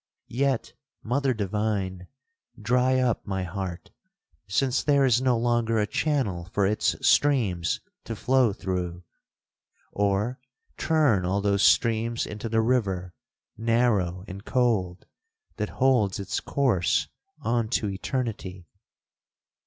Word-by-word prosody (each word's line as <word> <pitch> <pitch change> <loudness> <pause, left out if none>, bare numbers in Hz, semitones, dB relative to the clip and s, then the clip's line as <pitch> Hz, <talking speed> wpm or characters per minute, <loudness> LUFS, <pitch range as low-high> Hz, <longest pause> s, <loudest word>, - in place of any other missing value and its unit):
Yet, 135 -1 0 0.3
mother 135 +4 +1
divine! 100 -4 -2 0.5
dry 125 +4 +2
up 125 -4 0
my 95 -2 -2
heart, 90 -1 -6 0.6
since 130 +6 +1
there 140 -2 +3
is 125 -1 +3
no 130 -2 +2
longer 115 -1 +1
a 105 - +2
channel 105 - -1
for 100 - +2
its 105 +2 +1
streams 110 -13 +2 0.2
to 115 - -4
flow 130 0 +2
through!—or 95 +4 -4 0.4
turn 150 - +2
all 95 +3 0
those 100 -1 +1
streams 115 +2 +2
into 105 +2 -6
the 110 0 +2
river, 95 -7 0 0.4
narrow 110 -6 +1
and 100 +1 -8
cold, 110 -9 0 0.5
that 105 -1 -2
holds 125 -8 +2
its 100 +1 -2
course 110 -7 +1 0.3
on 115 -1 0
to 110 -3 0
eternity! 100 -3 -4
110 Hz, 115 wpm, -26 LUFS, 95-125 Hz, 0.6 s, there